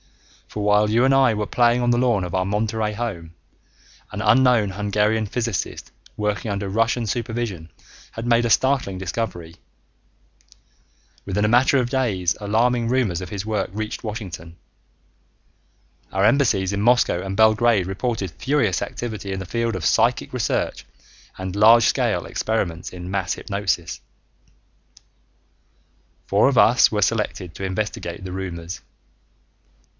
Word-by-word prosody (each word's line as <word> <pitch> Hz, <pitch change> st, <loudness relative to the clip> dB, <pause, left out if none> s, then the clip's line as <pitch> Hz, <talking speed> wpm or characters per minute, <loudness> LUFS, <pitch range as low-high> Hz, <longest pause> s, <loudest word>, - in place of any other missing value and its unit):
For 105 Hz, -, -5 dB
while 105 Hz, +1 st, +3 dB
you 115 Hz, +4 st, +3 dB
and 135 Hz, -, +3 dB
I 135 Hz, -3 st, +4 dB
were 105 Hz, 0 st, -2 dB
playing 120 Hz, +2 st, +2 dB
on 120 Hz, 0 st, +2 dB
the 120 Hz, -, +2 dB
lawn 120 Hz, -6 st, +2 dB
of 90 Hz, -, -7 dB
our 95 Hz, -1 st, +1 dB
Monterey 105 Hz, +2 st, -1 dB
home, 95 Hz, -8 st, -5 dB, 0.8 s
an -, -, -5 dB
unknown 125 Hz, -6 st, +4 dB
Hungarian 105 Hz, +2 st, 0 dB
physicist 115 Hz, -2 st, -3 dB, 0.3 s
working 105 Hz, -1 st, -2 dB
under 100 Hz, 0 st, -3 dB
Russian 115 Hz, +4 st, 0 dB
supervision 115 Hz, -6 st, -4 dB, 0.4 s
had 115 Hz, -, -6 dB
made 120 Hz, 0 st, +3 dB
a 120 Hz, -, 0 dB
startling 130 Hz, -6 st, +1 dB
discovery. 90 Hz, -3 st, -4 dB, 1.7 s
Within 100 Hz, +2 st, -1 dB
a -, -, +3 dB
matter 125 Hz, +5 st, +4 dB
of 125 Hz, -2 st, 0 dB
days 105 Hz, -10 st, 0 dB
alarming 115 Hz, +3 st, +1 dB
rumors 115 Hz, -9 st, 0 dB
of 90 Hz, -, -7 dB
his 100 Hz, +1 st, -5 dB
work 110 Hz, -1 st, -2 dB
reached 110 Hz, +3 st, -5 dB
Washington. 95 Hz, -7 st, -7 dB, 1.5 s
Our 95 Hz, +1 st, +1 dB
embassies 105 Hz, -8 st, +2 dB
in 100 Hz, -, -1 dB
Moscow 120 Hz, -6 st, +3 dB
and 95 Hz, 0 st, -5 dB
Belgrade 110 Hz, -2 st, +4 dB
reported 100 Hz, -1 st, -3 dB
furious 110 Hz, -, 0 dB
activity 110 Hz, -4 st, -5 dB
in 95 Hz, -, -3 dB
the 95 Hz, -, -6 dB
field 115 Hz, +2 st, -2 dB
of 90 Hz, -4 st, -4 dB
psychic -, -, +2 dB
research -, -, -1 dB, 0.5 s
and 95 Hz, 0 st, -5 dB
large 115 Hz, +3 st, +6 dB
scale -, -, +1 dB
experiments 90 Hz, -7 st, -2 dB
in 90 Hz, 0 st, -8 dB
mass 95 Hz, -3 st, -1 dB
hypnosis. 100 Hz, -4 st, -3 dB, 2.3 s
Four 100 Hz, +6 st, +4 dB
of 135 Hz, -, -1 dB
us 120 Hz, +2 st, +5 dB
were 105 Hz, -2 st, +1 dB
selected 100 Hz, -5 st, -2 dB
to -, -, -7 dB
investigate 95 Hz, -1 st, -4 dB
the 90 Hz, -, -6 dB
rumors. 90 Hz, -2 st, -6 dB
105 Hz, 140 wpm, -22 LUFS, 95-120 Hz, 2.3 s, large